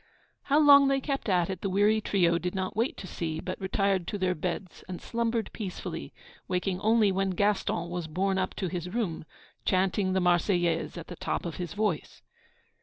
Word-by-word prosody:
How 285 Hz, -, +3 dB
long 285 Hz, -2 st, +8 dB
they 275 Hz, 0 st, +2 dB
kept 275 Hz, -4 st, -3 dB
it 180 Hz, -1 st, +2 dB
up 185 Hz, -, -6 dB
the 195 Hz, -, -1 dB
weary 205 Hz, +3 st, +3 dB
trio 170 Hz, -5 st, +2 dB
did 180 Hz, +3 st, -3 dB
not 190 Hz, -1 st, -2 dB
wait 230 Hz, +4 st, 0 dB
to -, -, -7 dB
see, 160 Hz, -3 st, -4 dB
but 185 Hz, +3 st, -5 dB
retired 190 Hz, -1 st, 0 dB
to 205 Hz, -, -2 dB
their 185 Hz, -2 st, +1 dB
beds, 180 Hz, +2 st, -5 dB
and 180 Hz, -, -5 dB
slumbered 230 Hz, -1 st, -1 dB
peacefully, 180 Hz, -5 st, -5 dB, 0.4 s
waking 180 Hz, 0 st, -1 dB
only 220 Hz, -2 st, +4 dB
when 195 Hz, +1 st, 0 dB
Gaston 190 Hz, -2 st, 0 dB
was 175 Hz, -1 st, -4 dB
borne 190 Hz, +4 st, 0 dB
up 185 Hz, -, -2 dB
to 190 Hz, -, -2 dB
his 180 Hz, 0 st, -4 dB
room, 185 Hz, -7 st, -2 dB, 0.4 s
chanting 185 Hz, 0 st, +1 dB
the 190 Hz, -, +2 dB
'Marseillaise' 175 Hz, -1 st, +1 dB
at 170 Hz, -, -6 dB
the 175 Hz, -, -8 dB
top -, -, -3 dB
of 170 Hz, -, -4 dB
his 175 Hz, -3 st, -4 dB
voice. 205 Hz, -7 st, -2 dB
185 Hz, 190 wpm, -28 LUFS, 175-210 Hz, 0.4 s, long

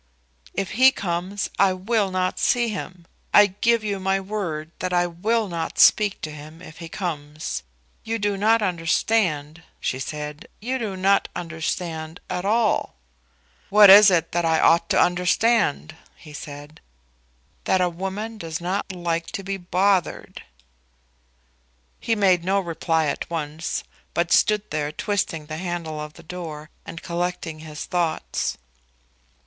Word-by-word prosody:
"If 195 Hz, -2 st, -2 dB
he 260 Hz, +3 st, +6 dB
comes 185 Hz, 0 st, -3 dB
I 195 Hz, -1 st, +5 dB
will 200 Hz, +2 st, 0 dB
not 185 Hz, 0 st, -1 dB
see 240 Hz, -1 st, +2 dB
him. 185 Hz, -4 st, -6 dB, 0.3 s
I 205 Hz, -, +9 dB
give 215 Hz, +4 st, +1 dB
you 200 Hz, -2 st, -2 dB
my 190 Hz, +1 st, +1 dB
word 185 Hz, -6 st, -4 dB
that 185 Hz, -, -2 dB
I 175 Hz, 0 st, +3 dB
will 210 Hz, +6 st, 0 dB
not 170 Hz, -3 st, -4 dB
speak 210 Hz, -2 st, +5 dB
to 155 Hz, -, -5 dB
him 150 Hz, +2 st, -11 dB
if 165 Hz, -2 st, -12 dB
he 165 Hz, -1 st, -8 dB
comes. 155 Hz, -, -4 dB, 0.4 s
You 225 Hz, +1 st, -2 dB
do 205 Hz, -2 st, 0 dB
not 220 Hz, +3 st, +3 dB
understand," 165 Hz, -3 st, 0 dB, 0.2 s
she 130 Hz, -, -2 dB
said; 150 Hz, +2 st, -6 dB
"you 255 Hz, +5 st, -2 dB
do 205 Hz, -5 st, -4 dB
not 195 Hz, +2 st, +3 dB
understand 165 Hz, -1 st, -4 dB
at 180 Hz, +1 st, -3 dB
all." 220 Hz, +1 st, +1 dB, 0.7 s
"What 205 Hz, -1 st, +9 dB
is 205 Hz, +1 st, +10 dB
it 170 Hz, -3 st, +1 dB
that 175 Hz, 0 st, 0 dB
I 160 Hz, -1 st, +2 dB
ought 170 Hz, 0 st, +4 dB
to -, -, +3 dB
understand?" 180 Hz, -, +2 dB, 0.2 s
he 150 Hz, -, -14 dB
asked. 145 Hz, 0 st, -9 dB, 0.9 s
"That 190 Hz, -, +3 dB
a 180 Hz, -, +3 dB
woman 195 Hz, +6 st, -5 dB
does 165 Hz, -3 st, -4 dB
not 185 Hz, +3 st, -2 dB
like 170 Hz, -2 st, -2 dB
to 195 Hz, -, -6 dB
be 195 Hz, +1 st, -3 dB
bothered." 185 Hz, +1 st, 0 dB, 1.6 s
He 225 Hz, -, 0 dB
made 185 Hz, -5 st, +3 dB
no 195 Hz, +2 st, +2 dB
reply 165 Hz, -2 st, 0 dB
at 145 Hz, -, -3 dB
once, 160 Hz, 0 st, -3 dB, 0.3 s
but 170 Hz, 0 st, 0 dB
stood 210 Hz, 0 st, +3 dB
there 150 Hz, -1 st, -1 dB
twisting 165 Hz, -4 st, -2 dB
the 155 Hz, +1 st, -6 dB
handle 170 Hz, -3 st, -4 dB
of 150 Hz, 0 st, -7 dB
the -, -, -15 dB
door, 155 Hz, -3 st, -7 dB, 0.2 s
and 165 Hz, -, -8 dB
collecting 170 Hz, -2 st, -3 dB
his 155 Hz, -1 st, -7 dB
thoughts. 170 Hz, -3 st, -1 dB
180 Hz, 150 wpm, -23 LUFS, 160-200 Hz, 1.6 s, is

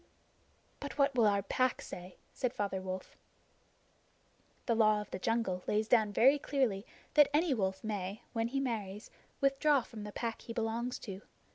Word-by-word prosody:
"But 285 Hz, 0 st, -6 dB
what 280 Hz, -1 st, +3 dB
will 235 Hz, -4 st, +4 dB
our 200 Hz, -1 st, +2 dB
Pack 255 Hz, -1 st, +1 dB
say?" 180 Hz, 0 st, -9 dB, 0.2 s
said 250 Hz, -1 st, -2 dB
Father 200 Hz, -2 st, -2 dB
Wolf. 185 Hz, 0 st, -6 dB, 1.5 s
The 235 Hz, -, +2 dB
Law 215 Hz, -2 st, +4 dB
of 210 Hz, -, -8 dB
the 180 Hz, -, -4 dB
Jungle 225 Hz, -4 st, 0 dB
lays 215 Hz, +1 st, +1 dB
down 220 Hz, -3 st, +4 dB
very 270 Hz, +8 st, +5 dB
clearly 245 Hz, -9 st, 0 dB, 0.3 s
that 295 Hz, -1 st, +7 dB
any 320 Hz, -1 st, +3 dB
wolf 190 Hz, -4 st, -1 dB
may, 205 Hz, -1 st, -4 dB
when 225 Hz, -1 st, 0 dB
he 270 Hz, +3 st, -1 dB
marries, 215 Hz, -6 st, -4 dB, 0.3 s
withdraw 275 Hz, 0 st, +3 dB
from 220 Hz, -3 st, -9 dB
the 210 Hz, -, -6 dB
Pack 230 Hz, +1 st, -4 dB
he 230 Hz, -, -7 dB
belongs 230 Hz, +2 st, -2 dB
to. 195 Hz, -3 st, -7 dB
225 Hz, 165 wpm, -33 LUFS, 200-255 Hz, 1.5 s, that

